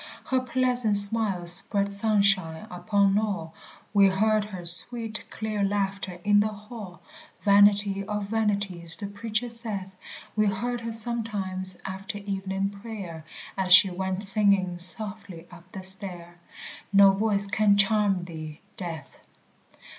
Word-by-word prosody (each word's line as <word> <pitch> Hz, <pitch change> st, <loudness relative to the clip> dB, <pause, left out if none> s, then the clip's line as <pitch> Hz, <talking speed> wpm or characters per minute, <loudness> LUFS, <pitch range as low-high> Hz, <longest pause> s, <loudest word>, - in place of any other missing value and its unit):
Her 260 Hz, -, -1 dB
pleasant 250 Hz, -4 st, 0 dB
smile 200 Hz, -3 st, +2 dB
spread 200 Hz, +3 st, +5 dB
sunshine 200 Hz, -5 st, +1 dB
upon 200 Hz, +2 st, 0 dB
all; 195 Hz, -7 st, -5 dB, 0.4 s
We 200 Hz, -1 st, +5 dB
heard 210 Hz, +2 st, 0 dB
her 185 Hz, -4 st, -10 dB
sweet 220 Hz, +6 st, +5 dB
clear 215 Hz, -2 st, -4 dB
laughter 195 Hz, -2 st, -3 dB
in 205 Hz, 0 st, +3 dB
the 210 Hz, -, +1 dB
Hall 210 Hz, -3 st, -11 dB, 0.4 s
Vanity 200 Hz, -1 st, +4 dB
of 210 Hz, 0 st, -4 dB
vanities 200 Hz, -5 st, -3 dB
the 205 Hz, -, -5 dB
Preacher 220 Hz, +3 st, -4 dB
saith 215 Hz, -5 st, -4 dB, 0.4 s
We 215 Hz, -1 st, +1 dB
heard 240 Hz, +5 st, -3 dB
her 230 Hz, 0 st, -6 dB
sometimes 210 Hz, -5 st, -1 dB
after 190 Hz, +1 st, -7 dB
evening 195 Hz, -1 st, -4 dB
prayer, 200 Hz, -6 st, -10 dB, 0.3 s
As 185 Hz, -2 st, +1 dB
she 185 Hz, 0 st, +4 dB
went 190 Hz, +1 st, -4 dB
singing 195 Hz, -3 st, +4 dB
softly 200 Hz, -1 st, -5 dB
up 175 Hz, +1 st, -16 dB
the 190 Hz, -, -9 dB
stair 180 Hz, -3 st, -1 dB, 0.5 s
No 200 Hz, -1 st, +6 dB
voice 200 Hz, 0 st, -1 dB
can 205 Hz, 0 st, +1 dB
charm 200 Hz, -2 st, +1 dB
thee, 155 Hz, -3 st, -10 dB, 0.2 s
Death. 165 Hz, -5 st, -8 dB
200 Hz, 130 wpm, -25 LUFS, 185-215 Hz, 0.5 s, No